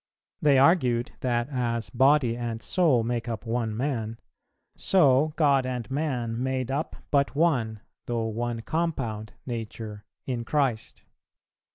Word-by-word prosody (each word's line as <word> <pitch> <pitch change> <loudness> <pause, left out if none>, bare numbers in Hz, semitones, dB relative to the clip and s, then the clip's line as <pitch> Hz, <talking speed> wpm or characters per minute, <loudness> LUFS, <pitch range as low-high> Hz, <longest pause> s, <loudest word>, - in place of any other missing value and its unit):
They 145 -2 +5
argued 130 -5 +3
that 120 -1 0
as 120 -3 -2
body 130 -1 +4
and 120 -1 -3
soul 145 -5 +2
made 120 0 -2
up 115 0 -4
one 115 -2 -1
man, 115 -4 -2 0.6
so 150 -4 +3
God 140 -4 +4
and 125 -1 -4
man 125 -6 -1
made 130 -1 -1
up 145 +4 -2 0.2
but 140 -1 +2
one, 125 -10 +1 0.3
though 115 -2 -1
one 115 +1 -3
compound 135 -11 -2
Nature, 110 -3 -6 0.2
in 125 -3 -2
Christ. 130 -4 -1
125 Hz, 130 wpm, -27 LUFS, 115-140 Hz, 0.6 s, They